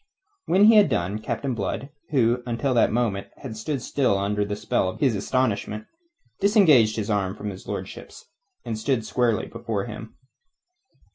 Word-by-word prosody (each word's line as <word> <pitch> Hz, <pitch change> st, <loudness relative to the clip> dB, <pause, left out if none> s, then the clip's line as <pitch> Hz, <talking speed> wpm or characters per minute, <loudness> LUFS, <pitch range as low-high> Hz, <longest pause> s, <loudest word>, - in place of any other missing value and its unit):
When 190 Hz, +4 st, +5 dB
he 220 Hz, 0 st, +7 dB
had 205 Hz, -6 st, +6 dB
done, 100 Hz, -2 st, -1 dB
Captain 130 Hz, +4 st, -3 dB
Blood, 120 Hz, +5 st, -3 dB, 0.2 s
who 125 Hz, -4 st, +2 dB
until 120 Hz, +3 st, -1 dB
that 120 Hz, -, +3 dB
moment 110 Hz, -4 st, -1 dB, 0.2 s
had 125 Hz, -5 st, -6 dB
stood 125 Hz, +4 st, -3 dB
still 130 Hz, -9 st, +1 dB
under 105 Hz, +1 st, 0 dB
the 105 Hz, 0 st, -3 dB
spell 95 Hz, -, 0 dB
of -, -, -8 dB
his 130 Hz, -6 st, +2 dB
astonishment, 105 Hz, -1 st, -1 dB, 0.5 s
disengaged 160 Hz, -, +5 dB
his 110 Hz, -1 st, -2 dB
arm 95 Hz, -2 st, 0 dB
from 105 Hz, -1 st, -5 dB
his 95 Hz, -, -11 dB
lordship's, -, -, -7 dB, 0.4 s
and 110 Hz, -, -3 dB
stood 115 Hz, -1 st, 0 dB
squarely 120 Hz, -3 st, +1 dB
before 105 Hz, -4 st, -4 dB
him. 110 Hz, -1 st, -9 dB
115 Hz, 160 wpm, -24 LUFS, 105-130 Hz, 0.5 s, he